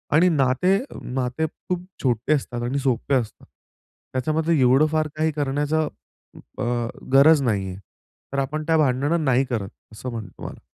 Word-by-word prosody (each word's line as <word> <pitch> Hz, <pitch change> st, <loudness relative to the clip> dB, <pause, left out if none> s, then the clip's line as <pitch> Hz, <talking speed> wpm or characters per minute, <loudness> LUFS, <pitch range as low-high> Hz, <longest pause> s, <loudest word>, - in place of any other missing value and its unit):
आणि 180 Hz, +4 st, +5 dB
नाते 145 Hz, +5 st, +2 dB
अ, 275 Hz, -, -10 dB
नाते 125 Hz, +4 st, -2 dB
खूप 180 Hz, +3 st, -5 dB, 0.2 s
छोटे 125 Hz, +3 st, +1 dB
असतात 120 Hz, -4 st, -2 dB
आणि 130 Hz, +4 st, -1 dB
सोपे 135 Hz, +1 st, 0 dB
असतात. 115 Hz, -4 st, -3 dB, 0.7 s
त्याच्यामध्ये 155 Hz, +4 st, +1 dB
एवढं 130 Hz, +4 st, +5 dB
फार 155 Hz, -1 st, +1 dB
काही 155 Hz, +1 st, +1 dB
करण्याच 145 Hz, +1 st, -1 dB
अ, 155 Hz, -1 st, +2 dB, 1.3 s
गरज 145 Hz, +2 st, +7 dB
नाहीये. 100 Hz, -6 st, -1 dB, 0.6 s
तर 140 Hz, -, 0 dB
आपण 150 Hz, +3 st, -2 dB
त्या 160 Hz, -, +4 dB
भांडणं 145 Hz, +3 st, +2 dB
नाही 130 Hz, 0 st, +3 dB
करत 110 Hz, -6 st, -3 dB, 0.2 s
असं 125 Hz, +4 st, -6 dB
म्हणतो 115 Hz, -3 st, -6 dB
तुम्हाला. -, -, -9 dB
135 Hz, 150 wpm, -23 LUFS, 125-155 Hz, 1.3 s, गरज